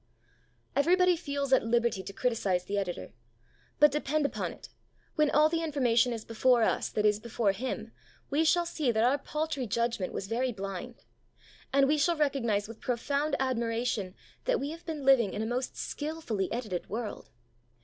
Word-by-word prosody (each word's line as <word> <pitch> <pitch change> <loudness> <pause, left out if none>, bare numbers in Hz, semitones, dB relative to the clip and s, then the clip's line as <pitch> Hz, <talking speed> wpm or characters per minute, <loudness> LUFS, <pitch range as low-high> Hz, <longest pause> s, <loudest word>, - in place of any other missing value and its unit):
Everybody 360 +5 +4
feels 280 -4 -2
at 265 - +5
liberty 235 -3 +1
to 200 - -7
criticize 200 -5 0
the 205 - -3
Editor; 175 - -5 0.7
but, 295 -1 +7
depend 300 +1 0
upon - - -2
it, - - -12 0.4
when 305 -2 +3
all 300 +1 +5
the 330 +1 -1
information 250 -6 +2
is 225 -2 -5
before 235 +1 +3
us - - +1
that 210 - -1
is 210 0 +3
before 225 -2 0
Him, 225 +1 -4 0.4
we 295 +3 +3
shall 345 +2 +3
see 305 -6 0
that 220 0 +1
our 265 +4 +3
paltry 300 -3 -3
judgement 235 -3 -1
was - - -4
very 245 +5 -1
blind. 195 +3 -6 0.7
And 275 0 +4
we 300 +1 +2
shall 335 +3 +2
recognize 235 -9 +1
with 225 0 -11
profound 280 +4 0
admiration 230 -6 -1 0.3
that - - +2
we 285 +2 -3
have 330 +2 -10
been 305 -4 -4
living 250 -7 +5
in 210 - -2
a - - -2
most 245 +3 -3
skilfully 290 - -3
edited 215 -7 -3
world. 220 +1 -5
250 Hz, 170 wpm, -30 LUFS, 220-290 Hz, 0.7 s, but